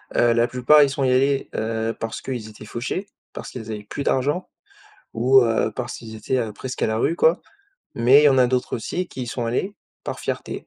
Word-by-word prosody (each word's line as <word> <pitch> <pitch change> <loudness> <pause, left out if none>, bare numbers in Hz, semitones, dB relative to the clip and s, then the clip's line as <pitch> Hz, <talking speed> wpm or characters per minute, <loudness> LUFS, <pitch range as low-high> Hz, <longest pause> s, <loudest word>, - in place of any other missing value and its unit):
heu, 120 -1 +4
la 115 0 +2
plupart 125 +5 +5
ils 140 - +2
sont 140 - -2
y 130 - +3
allés, 135 +2 +2
heu, 110 0 -2
parce 115 0 -4
qu'ils 120 -5 -5
étaient 105 0 -12
fauchés, 130 - -4 0.3
parce - - -7
qu'ils 115 -3 -7
avaient 105 -1 -6
plus 140 +7 -5
d'argent 145 +7 0 0.7
ou, 130 +4 +5
heu, 115 -1 +1
parce 125 -2 -4
qu'ils 110 -1 -10
étaient, 110 +4 -2
heu, 115 -3 -2
presque 130 +4 -6
à - - +3
la 110 - -1
rue 165 +8 +1
quoi. 165 0 +3 0.5
Mais 130 +5 +6
il - - +3
y - - +8
en 135 -2 +3
a 125 - +5
d'autres 125 0 -1
aussi 175 +10 -3
qui 130 - -7
y - - -5
sont 120 0 -3
allés 185 - -2 0.3
par - - -5
fierté - - -5
125 Hz, 230 wpm, -22 LUFS, 115-135 Hz, 0.7 s, y